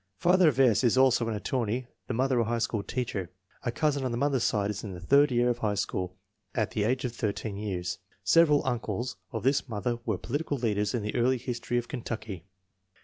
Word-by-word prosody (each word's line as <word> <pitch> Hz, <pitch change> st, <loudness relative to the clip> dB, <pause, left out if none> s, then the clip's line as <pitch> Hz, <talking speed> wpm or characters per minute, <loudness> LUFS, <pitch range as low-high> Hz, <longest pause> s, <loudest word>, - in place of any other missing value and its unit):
Father 180 Hz, -, +5 dB
of 135 Hz, -3 st, -3 dB
S. 125 Hz, -3 st, +5 dB
is 120 Hz, 0 st, +3 dB
also 130 Hz, -3 st, +4 dB
an 110 Hz, -, -1 dB
attorney, 120 Hz, +3 st, -1 dB, 0.2 s
the -, -, -2 dB
mother 130 Hz, 0 st, +2 dB
a 115 Hz, -, +2 dB
high 120 Hz, +1 st, 0 dB
school 115 Hz, -2 st, -1 dB
teacher. 100 Hz, -6 st, -3 dB, 0.3 s
A 120 Hz, -, -1 dB
cousin 145 Hz, +1 st, 0 dB
on 130 Hz, -, 0 dB
the 120 Hz, -, -2 dB
mother's 135 Hz, -1 st, +1 dB
side 105 Hz, -1 st, +1 dB
is 105 Hz, -, -6 dB
in 100 Hz, -4 st, -6 dB
the -, -, -8 dB
third 140 Hz, +10 st, +4 dB
year 120 Hz, 0 st, +3 dB
of 120 Hz, -, -4 dB
high 105 Hz, -3 st, 0 dB
school 90 Hz, -2 st, -2 dB, 0.4 s
at -, -, 0 dB
the 105 Hz, -, 0 dB
age 130 Hz, +3 st, 0 dB
of 120 Hz, -, -3 dB
13 105 Hz, -1 st, -2 dB
years. 90 Hz, -3 st, -3 dB, 0.2 s
Several 150 Hz, -, +5 dB
uncles 120 Hz, -1 st, -2 dB
of 110 Hz, -4 st, -4 dB
the 135 Hz, +2 st, +3 dB
mother 120 Hz, +1 st, -2 dB
were 110 Hz, -5 st, -1 dB
political 145 Hz, -, -2 dB
leaders 105 Hz, -3 st, 0 dB
in 115 Hz, -, -2 dB
the 105 Hz, -, -3 dB
early 125 Hz, +2 st, +2 dB
history 120 Hz, 0 st, -3 dB
of 120 Hz, -, -1 dB
Kentucky. 110 Hz, -, -5 dB
120 Hz, 215 wpm, -28 LUFS, 105-130 Hz, 0.4 s, Father